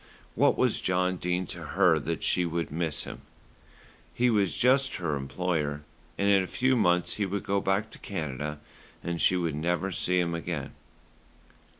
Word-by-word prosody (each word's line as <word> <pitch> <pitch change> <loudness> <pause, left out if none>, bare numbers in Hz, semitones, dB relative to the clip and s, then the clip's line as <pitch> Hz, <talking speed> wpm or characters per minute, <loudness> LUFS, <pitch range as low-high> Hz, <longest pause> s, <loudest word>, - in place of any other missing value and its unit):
What - - +3
was - - +2
John 90 0 +1
Dene 90 +1 -1
to - - -8
her - - +3
that - - -3
she - - +2
should 85 -2 -2
miss 80 -1 -1
him? - - -8 0.9
He 125 0 +3
was 100 -4 +1
just 135 +2 +3
her 85 -5 -1
employer, 75 +1 -2 0.3
and 100 - +1
in 100 -1 +5
a 95 - -3
few 130 +5 +1
months 90 -6 +2
he 105 - +1
would 100 +1 -3
go 100 0 0
back 100 +3 0
to - - -12
Canada, 75 -5 -4 0.5
and 85 -1 -3
she 95 - +4
would 85 -3 -1
never 90 +5 -1
see 90 +1 +1
him 85 -1 0
again. 85 -4 -4
90 Hz, 175 wpm, -28 LUFS, 80-100 Hz, 0.9 s, in